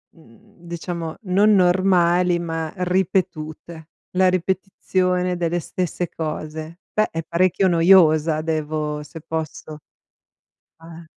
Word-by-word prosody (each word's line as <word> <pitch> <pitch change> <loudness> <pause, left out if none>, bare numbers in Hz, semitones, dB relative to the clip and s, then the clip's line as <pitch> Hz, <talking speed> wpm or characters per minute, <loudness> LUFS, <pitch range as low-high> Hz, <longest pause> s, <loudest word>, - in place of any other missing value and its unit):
mhmm, 160 +3 -21
diciamo 170 -1 -5
non 200 +3 +4
normali 180 -2 +3
ma 165 -2 -4
ripetute, 170 -3 -2 0.3
la 185 0 +5
ripetizione 185 0 -1
delle 175 0 -1
stesse 175 +1 -3
cose. 155 +1 -6
Beh, 215 0 +1
è 165 - -3
parecchio 180 +3 +1
noiosa, 165 -3 +4
devo 155 -1 -2
se 155 +2 -11
posso. 155 -1 -5 1.1
Eh. 165 0 -11
170 Hz, 100 wpm, -21 LUFS, 160-180 Hz, 1.1 s, la